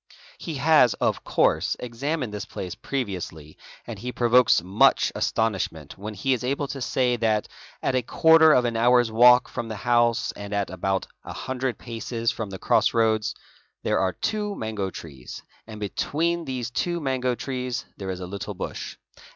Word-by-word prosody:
He 165 - -5
has, 140 -5 +4
of - - -1
course,'examined 125 +1 0
this 105 - -4
place 90 -2 -6
previously 90 - -5 0.3
and - - -7
he 125 +1 -4
provokes 120 -5 +4
much 95 +4 +3
astonish 110 -4 0
ment 75 -3 -12
when 105 +2 -7
he 135 +7 +1
is 125 - -3
able 140 +3 -1
to 135 0 -5
say 125 -1 +1
that 110 -2 +1 0.4
at - - +1
a 130 - +2
quarter 160 +5 +5
of 125 -4 +4
an 120 -1 -1
hour's 120 0 +4
walk 125 +2 +6
from 120 - -5
the 110 - -5
house, 120 +2 +2
and 100 0 -6
at 100 -4 -1
about 95 +1 -1 0.2
a - - -7
hundred 130 -1 -3
paces 115 -1 -3
from 110 -3 -5
the 95 - -6
cross - - +2
roads, 110 -2 +2 0.5
there - - +1
are 95 -1 +1
two 210 - -2
mango 110 -3 -3
trees 70 -9 -10 0.2
and 110 -1 -9
between 165 - -1
these 125 -3 -4
two 130 -2 -1
trees 125 0 -4
there 95 -1 -6
is 95 -1 -4
a - - -4
little 100 +2 -6
bush. - - -6
115 Hz, 170 wpm, -25 LUFS, 100-130 Hz, 0.5 s, walk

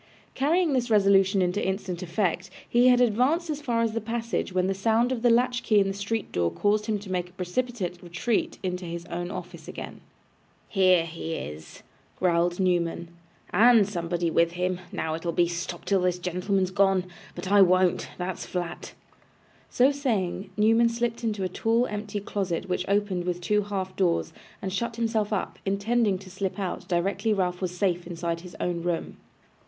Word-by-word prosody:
Carrying 315 +3 +2
this 250 -2 0
resolution 195 -2 +4
into 180 +3 0
instant 190 -2 -2
effect, 185 0 -1 0.2
he 240 +1 +4
had 250 -1 +6
advanced 260 +9 +2
as 300 0 -4
far 235 -5 0
as 225 - +1
the 230 +1 -2
passage, 230 -1 -2
when 185 0 +1
the 195 - +1
sound 225 +5 +2
of 250 -3 -2
the 240 - +4
latch 245 +1 +3
key 215 -2 +3
in 195 - +3
the 195 - -1
street 205 +2 -3
door 85 -1 +1
caused 210 - 0
him 215 -2 +1
to 200 -2 -9
make 180 -1 -1
a - - -23
precipitate 185 -1 -3
retreat 180 +6 -1
into 180 -1 -3
his 170 0 -6
own 175 +1 -3
office - - -8
again. - - -8 0.7
'Here 185 -4 +4
he 165 0 -5
is,' 75 - -8 0.3
growled 175 0 +1
Newman, 170 -2 0 0.4
'and 230 -2 +6
somebody 170 -3 -2
with 170 +1 +3
him. 180 0 -1
Now 160 - -2
it'll 165 +1 -2
be 175 +1 +3
"Stop 175 0 -5
till 195 -2 +2
this 180 -1 +1
gentleman's 180 +1 -1
gone." 195 -1 +3 0.3
But 190 - -5
I 205 -1 +7
won't. 185 -1 +4
That's 180 0 -4
flat.' 175 -2 -5 0.7
So 255 +3 +4
saying, 215 -10 -1
Newman 225 +2 +4
slipped 235 0 -2
into 210 -4 -1
a - - +1
tall 225 +6 +1
empty 210 -2 -4
closet 190 -3 -2
which 180 0 -1
opened 200 -3 +1
with 175 -1 -1
two 210 +4 +1
half 190 -2 -4
doors, 175 -3 +1 0.3
and 190 -1 -3
shut 235 +3 -2
himself 225 -2 0
up; 205 - -2
intending 200 +1 +1
to 185 0 -12
slip 190 0 -3
out 190 -2 -4
directly 195 +4 0
Ralph 180 -2 -1
was 180 -1 -3
safe 175 -3 0
inside 170 -1 -3
his 180 0 -11
own 175 -1 -1
room. 170 -1 -3
190 Hz, 180 wpm, -26 LUFS, 180-220 Hz, 0.7 s, I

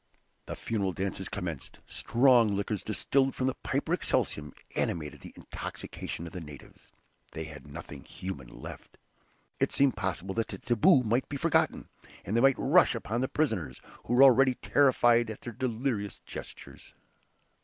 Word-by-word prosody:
The - - -4
funeral 100 -5 -2
dances 95 0 -3
commenced. 85 -8 -5
Strong 120 -4 +3
liquors 100 +1 -2
distilled 135 +5 +1
from 130 - -1
the 130 - +1
"piper - - -2
excelsum" 75 0 -1 0.2
animated 75 -3 -2
the - - -10
intoxication 85 - -6
of 85 - -9
the 90 - -6
natives. 75 -3 -13 0.4
They 80 - -4
had 75 -2 -10
nothing - - -9
human 85 -9 -7
left. - - -11 0.6
It - - +1
seemed 140 -1 +3
possible 95 0 -3
that 115 +1 -1
the - - -6
"taboo" 125 +2 +4
might 120 +3 0
be 145 - -3
forgotten, - - +1 0.4
and 105 - -2
they 115 - +4
might 135 0 +5
rush 165 0 +4
upon 115 +1 -2
the 130 - +1
prisoners, 90 - -1 0.3
who 120 - 0
were 130 - +8
already 130 0 +6
terrified 120 -5 +3
at 110 - -7
their 120 - -7
delirious 115 -4 -2
gestures. - - -10
115 Hz, 155 wpm, -29 LUFS, 95-130 Hz, 0.6 s, were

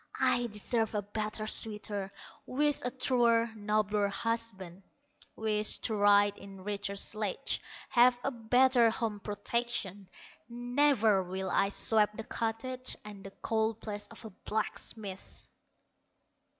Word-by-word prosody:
I 240 0 +2
deserve 220 +1 -1
a 205 - 0
better 215 +1 -4
suitor, 210 -3 0 0.4
Wish 295 +2 +1
a 250 - -1
truer, 235 -3 +2
nobler 210 -1 +1
husband, 200 -4 -3 0.5
Wish 215 -1 +2
to 220 - 0
ride 205 0 +4
in 195 -1 -11
richer 200 0 -3
sledges, 215 +4 -1 0.3
Have 245 +1 +5
a 275 - 0
better 245 0 +4
home 220 -2 -2
protection; 205 -2 -2 0.4
Never 245 -4 +2
will 190 +1 -4
I 195 - +2
sweep 210 0 +3
the 225 - -5
cottage 240 +4 -3
And 205 -2 -10
the 195 - -9
coal 220 0 +1
place 210 -1 -6
of 230 0 -13
a 220 - -8
blacksmith." 210 -1 -5
215 Hz, 125 wpm, -31 LUFS, 205-235 Hz, 0.5 s, Have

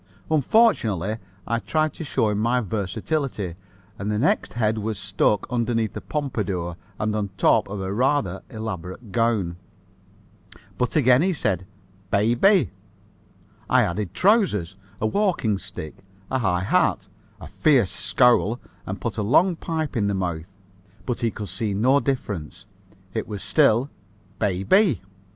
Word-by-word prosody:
Unfortunately, 120 - +3 0.3
I 115 +1 0
tried 155 +10 0
to - - -7
show 110 -7 0
my 115 +4 +1
versatility, 105 - -2 0.5
and 100 +2 -3
the 105 - 0
next 135 +8 +1
head 110 -1 0
was 110 0 -3
stuck 100 +1 +1
underneath 115 -2 0
a - - -4
pompadour 100 - -3 0.2
and 105 0 -1
on 105 -2 -1
top - - +3
of 100 0 -5
a 95 +1 -3
rather 120 -6 +1
elaborate 110 -1 -6
gown. 105 -6 0 1.2
But 125 - 0
again 130 -3 +5
he 185 0 +1
called - - -5 0.2
it 95 - -16 0.4
"baybay." 120 - +3 1.0
I - - +5
added 90 +1 -3
trousers, 180 - +2 0.2
a - - -1
walking 145 - +1
stick, 80 -5 -8 0.3
a 130 - +1
high 90 -6 +1
hat, - - +1 0.3
a - - -9
fierce 130 - +2
scowl 120 0 +3 0.3
and 95 - -4
put 115 -2 -3
a - - +1
long 165 - +3
pipe 160 -3 -3
in 105 -4 +1
the 100 - 0
mouth, 90 -2 -3 0.6
but 125 - -2
he 115 - +1
could 105 -1 -6
see 105 -3 -2
no 130 +7 +4
difference. 105 - -4 0.5
It 110 - -3
was 105 -2 -6
still 140 -3 +3
a 100 0 -32 0.2
"baybay." 190 - +4
110 Hz, 145 wpm, -24 LUFS, 100-135 Hz, 1.2 s, again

